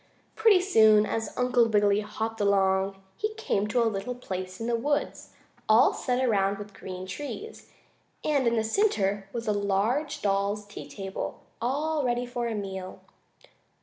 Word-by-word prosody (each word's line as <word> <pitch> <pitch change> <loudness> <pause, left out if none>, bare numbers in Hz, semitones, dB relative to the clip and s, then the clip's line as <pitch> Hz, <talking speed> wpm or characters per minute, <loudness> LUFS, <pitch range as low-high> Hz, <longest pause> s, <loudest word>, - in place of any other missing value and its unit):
Pretty 440 -4 +5
soon, 220 - +5
as 225 +1 -2
Uncle 250 -2 +3
Wiggily 205 -1 +3
hopped 220 +1 -4
along, 195 -1 +2
he 430 0 -2
came 430 - -1
to 235 +3 +2
a - - +1
little 220 +3 -2
place 185 -6 -6
in 225 - -4
the 235 0 +1
woods, 290 +5 -2 0.4
all 220 +3 +6
set 255 +1 0
around 200 -4 +2
with 205 0 -9
green 185 0 -7
trees, 290 - -7 0.5
and 280 -5 +2
in 235 - +2
the 220 - +1
center 205 - +1
was 230 +1 -5
a 210 - +2
large 220 +10 0
doll's 200 +1 0
tea 205 - -10
table, 195 -1 -6 0.2
all 295 +5 0
ready 245 -1 0
for 240 -1 -3
a 230 - -2
meal. 190 -2 -6
220 Hz, 160 wpm, -27 LUFS, 200-250 Hz, 0.5 s, all